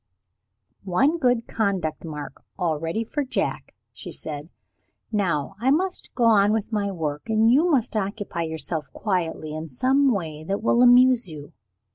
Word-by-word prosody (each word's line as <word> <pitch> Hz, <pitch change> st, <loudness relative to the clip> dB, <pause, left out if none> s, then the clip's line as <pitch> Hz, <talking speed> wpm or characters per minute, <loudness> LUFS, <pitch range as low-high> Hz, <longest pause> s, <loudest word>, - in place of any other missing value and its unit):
"One 270 Hz, -, +2 dB
good 245 Hz, -4 st, +2 dB
conduct 190 Hz, -8 st, -1 dB
mark 150 Hz, -4 st, -8 dB
already 165 Hz, +3 st, -1 dB
for 290 Hz, +6 st, -3 dB
Jack," 260 Hz, -, -3 dB, 0.2 s
she -, -, -9 dB
said. 150 Hz, +1 st, -7 dB, 0.6 s
"Now 180 Hz, -8 st, 0 dB
I 250 Hz, +4 st, +1 dB
must 360 Hz, +6 st, 0 dB
go 245 Hz, -, 0 dB
on 210 Hz, -3 st, +5 dB
with 220 Hz, 0 st, -2 dB
my 205 Hz, -2 st, 0 dB
work; 155 Hz, -1 st, -4 dB
and 220 Hz, +1 st, +4 dB
you 310 Hz, +8 st, +4 dB
must 255 Hz, -8 st, +1 dB
occupy 200 Hz, -3 st, -3 dB
yourself 160 Hz, -2 st, -4 dB
quietly, 170 Hz, -6 st, -2 dB
in 155 Hz, +1 st, -6 dB
some 265 Hz, -, +2 dB
way 160 Hz, -7 st, -3 dB
that 195 Hz, +4 st, -2 dB
will 235 Hz, +1 st, +3 dB
amuse 250 Hz, -3 st, +6 dB
you. 150 Hz, -2 st, -10 dB
200 Hz, 150 wpm, -24 LUFS, 160-240 Hz, 0.6 s, amuse